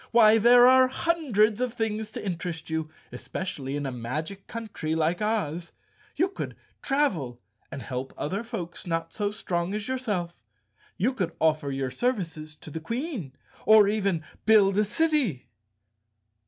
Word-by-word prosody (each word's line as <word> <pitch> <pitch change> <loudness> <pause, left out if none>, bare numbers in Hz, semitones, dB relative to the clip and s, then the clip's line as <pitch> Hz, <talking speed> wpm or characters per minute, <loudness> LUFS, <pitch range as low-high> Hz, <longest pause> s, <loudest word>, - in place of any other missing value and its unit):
Why, 225 -1 +6
there 245 +2 +7
are 260 0 +7
hundreds 255 -8 +1
of 250 -2 -1
things 220 -2 -2
to - - -6
interest 170 -3 -4
you, 160 -1 -2 0.2
especially 135 +2 -5
in 145 -1 -3
a 135 - -2
magic 150 +11 -5
country 210 -9 -4
like 165 +3 +1
Oz. 175 -6 -1 0.4
You 360 +5 +2
could 385 - -6 0.3
travel, 180 - 0 0.3
and 135 -2 -6
help 130 +1 -4
other 195 +9 -2
folks 185 -8 -6
not 165 -1 -2
so 205 -2 -1
strong 185 -3 -2
as 210 -1 -4
yourself. 205 - -3 0.5
You 240 +8 +1
could 180 -9 -2
offer 155 -3 +2
your 135 -1 -2
services 165 - -2
to 155 - -10
the 160 - -4
Queen, 230 - -4 0.3
or 215 -2 +7
even 200 -6 0 0.2
build 205 -3 +6
a 210 - +3
city!" 235 - +1
195 Hz, 150 wpm, -27 LUFS, 160-230 Hz, 0.5 s, there